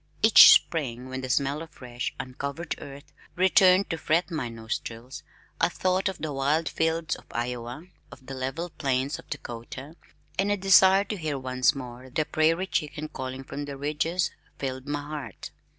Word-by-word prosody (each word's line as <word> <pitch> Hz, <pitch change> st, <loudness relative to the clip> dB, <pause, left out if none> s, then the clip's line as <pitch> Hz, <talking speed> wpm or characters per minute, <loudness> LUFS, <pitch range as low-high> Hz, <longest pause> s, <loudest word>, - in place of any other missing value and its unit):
Each 220 Hz, 0 st, +10 dB
spring 130 Hz, -6 st, +2 dB
when 130 Hz, 0 st, -4 dB
the 130 Hz, -, -5 dB
smell 140 Hz, +2 st, +1 dB
of 165 Hz, -, -8 dB
fresh, 125 Hz, -4 st, -5 dB
uncovered 140 Hz, +5 st, -4 dB
earth 140 Hz, 0 st, -11 dB, 0.2 s
returned 185 Hz, +1 st, +5 dB
to 165 Hz, -, -3 dB
fret 170 Hz, +3 st, +1 dB
my 150 Hz, -7 st, -2 dB
nostrils 115 Hz, +2 st, -6 dB, 0.4 s
I -, -, +3 dB
thought 185 Hz, +1 st, 0 dB
of 190 Hz, -, -6 dB
the 155 Hz, -2 st, -4 dB
wide 145 Hz, +4 st, +1 dB
fields 160 Hz, 0 st, 0 dB
of -, -, -15 dB
Iowa, 120 Hz, +3 st, -4 dB, 0.3 s
of 130 Hz, -, -14 dB
the 135 Hz, -, -7 dB
level 135 Hz, +7 st, -4 dB
plains 135 Hz, +3 st, -1 dB
of -, -, -15 dB
Dakota, 135 Hz, +3 st, -7 dB, 0.4 s
and 200 Hz, +1 st, +2 dB
a 205 Hz, -, +2 dB
desire 195 Hz, 0 st, +6 dB
to 205 Hz, +1 st, -5 dB
hear 155 Hz, -5 st, -2 dB
once 130 Hz, +2 st, +1 dB
more 125 Hz, -1 st, -8 dB
the 150 Hz, +4 st, 0 dB
prairie 160 Hz, +4 st, +2 dB
chicken 155 Hz, -3 st, -3 dB
calling 130 Hz, -1 st, -6 dB
from 145 Hz, +2 st, -6 dB
the 140 Hz, -1 st, -7 dB
ridges 155 Hz, +5 st, -1 dB, 0.3 s
filled 130 Hz, 0 st, -4 dB
my 145 Hz, 0 st, -2 dB
heart. 150 Hz, -1 st, -7 dB
145 Hz, 170 wpm, -27 LUFS, 130-165 Hz, 0.4 s, Each